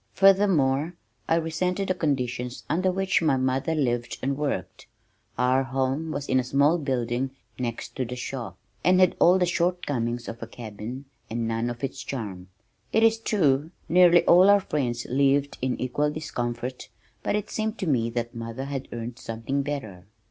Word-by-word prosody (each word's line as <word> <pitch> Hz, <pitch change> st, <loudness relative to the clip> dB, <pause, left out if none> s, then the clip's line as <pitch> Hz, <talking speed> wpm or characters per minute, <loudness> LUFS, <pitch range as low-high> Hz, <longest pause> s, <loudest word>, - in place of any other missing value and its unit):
Furthermore, 175 Hz, -6 st, +4 dB, 0.3 s
I 165 Hz, -, +4 dB
resented 180 Hz, +4 st, -1 dB
the -, -, +3 dB
conditions 125 Hz, -7 st, -2 dB
under 185 Hz, +3 st, +1 dB
which 190 Hz, 0 st, +1 dB
my 150 Hz, -5 st, +3 dB
mother 130 Hz, +5 st, 0 dB
lived 120 Hz, -5 st, -1 dB
and 135 Hz, +1 st, 0 dB
worked. 145 Hz, 0 st, -3 dB, 0.5 s
Our 125 Hz, +2 st, +3 dB
home 135 Hz, +4 st, -1 dB
was 145 Hz, -2 st, -4 dB
in 130 Hz, -, +3 dB
a -, -, 0 dB
small 140 Hz, +6 st, +3 dB
building 130 Hz, -2 st, -1 dB, 0.3 s
next 120 Hz, -2 st, -4 dB
to 130 Hz, -, 0 dB
the 125 Hz, +2 st, -5 dB
shop, 125 Hz, -1 st, -5 dB, 0.3 s
and 185 Hz, +1 st, +5 dB
had 185 Hz, -1 st, +5 dB
all 180 Hz, +2 st, +6 dB
the 180 Hz, -, +3 dB
shortcomings 145 Hz, -10 st, -1 dB
of 115 Hz, +1 st, -7 dB
a -, -, -5 dB
cabin 115 Hz, +4 st, -7 dB, 0.2 s
and 115 Hz, 0 st, -2 dB
none 115 Hz, +1 st, -1 dB
of 120 Hz, +2 st, -7 dB
its 135 Hz, 0 st, -3 dB
charm. 100 Hz, -8 st, -5 dB, 0.4 s
It 220 Hz, -, +3 dB
is 225 Hz, 0 st, +4 dB
true 155 Hz, -, +2 dB, 0.2 s
nearly 175 Hz, +1 st, +6 dB
all 180 Hz, +3 st, +7 dB
our 205 Hz, 0 st, +6 dB
friends 120 Hz, -9 st, -2 dB
lived 140 Hz, +2 st, +2 dB
in 130 Hz, -1 st, -1 dB
equal 135 Hz, +4 st, 0 dB
discomfort, 125 Hz, -5 st, -4 dB, 0.3 s
but -, -, 0 dB
it 210 Hz, 0 st, -3 dB
seemed 220 Hz, +1 st, -2 dB
to 190 Hz, -, -3 dB
me 120 Hz, -6 st, +2 dB
that 120 Hz, 0 st, -3 dB
mother 115 Hz, +3 st, -5 dB
had 135 Hz, -1 st, -4 dB
earned 120 Hz, +1 st, -6 dB
something 115 Hz, +5 st, -3 dB
better. 110 Hz, -11 st, -5 dB
135 Hz, 170 wpm, -26 LUFS, 120-165 Hz, 0.5 s, all